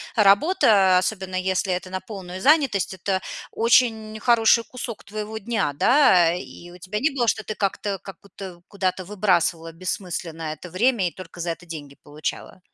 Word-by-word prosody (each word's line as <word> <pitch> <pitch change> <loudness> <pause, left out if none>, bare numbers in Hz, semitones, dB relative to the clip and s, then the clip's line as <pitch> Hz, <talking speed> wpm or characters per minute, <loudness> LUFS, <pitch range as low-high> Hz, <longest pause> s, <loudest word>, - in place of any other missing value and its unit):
работа, 200 - +5
особенно 185 -1 -3
если 185 0 0
это 185 +1 -4
на 185 0 -3
полную 185 -2 -8
занятость, 265 - +3
это 190 +1 -1 0.3
очень 225 -2 +2
хороший 230 0 +4
кусок 240 -2 -7
твоего 215 +1 -6
дня, 210 -9 -1
да. 180 - +5
И 175 -1 -9
у 180 - -12
тебя 190 +4 -4
не 310 - +2
было, 250 -5 -1
что 220 0 +1
ты 215 - -5
как-то 200 0 -2
как 190 -2 -11
будто 190 -3 -10
куда-то 185 -2 -2
выбрасывала 175 -4 0
бессмысленно 165 -2 -4
это 175 +4 -11
время 205 +2 +1
и 170 - -4
только 180 -1 -12
за 170 0 -3
это 170 +2 -5
деньги 145 -4 -9
получала? 150 +5 -6
190 Hz, 165 wpm, -23 LUFS, 180-220 Hz, 0.3 s, работа